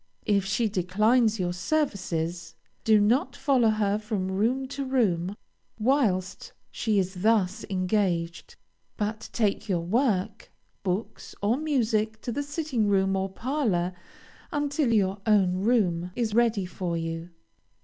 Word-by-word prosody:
If 200 -2 +2
she 220 +4 +1
declines 215 +4 +2
your 175 -1 -1
services, 175 - -2 0.3
do 220 -1 +5
not 245 +5 +2
follow 265 -4 +3
her 210 -1 +1
from 210 -3 -3
room 240 +7 0
to 280 0 -4
room 205 -9 0 0.4
whilst 220 -6 0 0.2
she 220 -3 0
is 185 -1 -1
thus 210 -3 +2
engaged, 185 -3 -1 0.4
but 215 +1 -3
take 215 -1 0
your 175 -3 +1
work, 220 -1 0 0.3
books, 190 +3 -4
or 210 +4 +3
music 225 -7 0
to 240 - -4
the 285 - -2
sitting 285 -6 -1
room 195 -1 +2
or 190 0 -1
parlor, 200 -6 -1 0.6
until 290 -3 0
your 195 -2 +1
own 190 -4 +3
room 185 -5 +1
is 230 -3 -1
ready 230 -4 +2
for 180 -2 -3
you. 165 +1 -4
210 Hz, 130 wpm, -27 LUFS, 185-235 Hz, 0.6 s, do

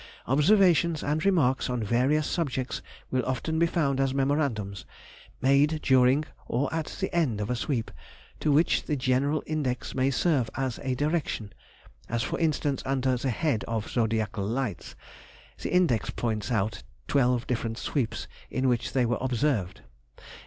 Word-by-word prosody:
Observations 170 - +4
and 150 +2 0
remarks 145 -12 +2
on 125 -2 -1
various 130 +8 +2
subjects 135 -7 -2 0.3
will 130 -1 +1
often 145 +5 -1
be 170 - +4
found 140 -6 0
as 135 -1 +1
memorandums, 135 -9 0 0.6
made 140 +4 +3
during 130 +2 +4 0.2
or 135 +5 -1
at 160 -2 -2
the 190 -2 -2
end 140 -11 +1
of 105 +3 -2
a - - +1
sweep, 120 -1 -2 0.5
to 150 - +1
which 155 +4 +3
the 150 - 0
general 135 +3 +1
index 145 -5 -2
may 130 0 +2
serve 140 -4 +1
as 130 -3 -2
a 130 -2 -1
direction—as 120 - -4
for - - -3
instance 150 -4 0
under 130 -1 +1
the 130 +2 -2
head 130 -2 0
of 115 -1 -3
zodiacal 110 -3 0
lights—the 115 -2 -6
index 170 -11 +2
points 110 0 -2
out 105 -2 0 0.3
twelve 125 -3 +2
different 115 -2 -2
sweeps 120 -6 -2 0.2
in 130 0 0
which 120 -2 0
they 130 -2 +3
were 120 +1 0
observed. 125 -6 0
130 Hz, 145 wpm, -27 LUFS, 120-150 Hz, 0.6 s, Observations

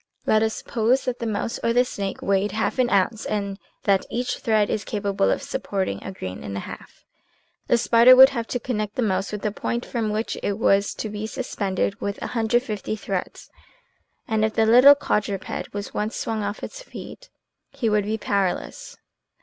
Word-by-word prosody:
Let 215 - +3
us 220 0 0
suppose 240 +4 0
that 250 -1 -2
the 235 - -3
mouse 215 +1 -2
or 230 - +2
the 245 +1 +4
snake 200 -5 -5
weighed 195 0 +1
half 220 +4 -1
an 250 -1 +3
ounce 205 +2 +1
and 200 -2 -3 0.2
that 195 -2 +3
each 245 +1 -2
thread 215 -2 +2
is 210 - -2
capable 200 -2 0
of - - 0
supporting 195 -2 -3
a - - -5
grain 95 - -7
and 100 -1 -5
a - - -3
half. - - -11 0.6
The 240 - +4
spider 235 +2 +7
would 265 +1 +10
have 235 -4 -4
to 245 - -2
connect 215 -3 -3
the 250 - 0
mouse 195 -2 0
with 210 -1 -5
the 210 - 0
point 235 +3 -3
from 230 -3 -2
which 215 +2 -2
it 200 - -1
was 200 -2 +2
to 215 - -4
be 210 +1 -4
suspended 200 -4 -2
with 200 0 -3
150 225 -2 -1
threads, 195 -3 -5 0.8
and 220 -1 +1
if 220 0 0
the 225 - +3
little 250 +6 +8
quadruped 205 -8 -2
was 205 0 -6
once 210 +2 -2
swung 220 -1 -2
off 205 +1 -4
his - - -7
feet, - - -10 0.4
he 275 -4 -3
would 210 -2 +2
be 220 +1 -1
powerless. 200 -3 -2
215 Hz, 190 wpm, -23 LUFS, 200-235 Hz, 0.8 s, would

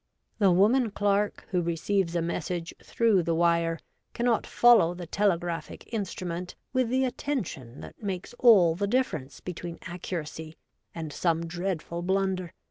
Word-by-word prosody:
The 200 -3 +5
woman 220 +7 +4
clerk 205 0 0
who 180 -2 +2
receives 170 +2 0
a 170 - +1
message 170 0 -3
through 225 -5 +2
the 165 0 0
wire 170 0 +2 0.4
cannot 235 -1 +1
follow 225 -8 +5
the 175 0 -7
telegraphic 175 -2 -1
in 220 -4 -1
strument 180 0 -5 0.2
with 255 -3 +1
the 260 +2 +2
attention 190 - -4
that - - -11
makes 195 -1 -4
all 195 -9 +7
the 200 +4 -1
difference 200 - -1
between 175 -1 -6
accuracy 165 -3 -6 0.4
and 160 -3 -5
some 165 0 0
dreadful 175 0 -3
blunder. 190 -1 0
180 Hz, 140 wpm, -28 LUFS, 170-205 Hz, 0.4 s, all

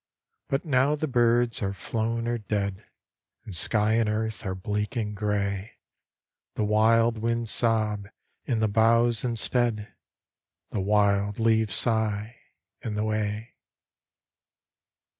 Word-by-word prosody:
But 135 +4 -1
now 140 0 +2
the 155 +1 -2
birds 120 -2 +2
are 100 -1 -1
flown 115 +4 -2
or 120 0 -1
dead; 100 -2 -3 0.6
And 100 - -5
sky 105 - +3
and 115 -1 +2
earth 110 0 -2
are 95 - -2
bleak 105 +5 -3
and 105 -3 -2
gray; 100 -1 -2 0.8
The - - -1
wild 115 +2 +3
winds 115 0 -1
sob 110 -3 +1 0.4
i' 130 - 0
the 110 -1 +1
boughs 115 +2 +3
instead, 120 -2 0 0.8
The 100 - -2
wild 100 0 +2
leaves 110 -2 +2
sigh 110 0 -1 0.5
i' - - -3
the 105 0 -2
way. 110 +1 -2
110 Hz, 120 wpm, -26 LUFS, 105-115 Hz, 0.8 s, sky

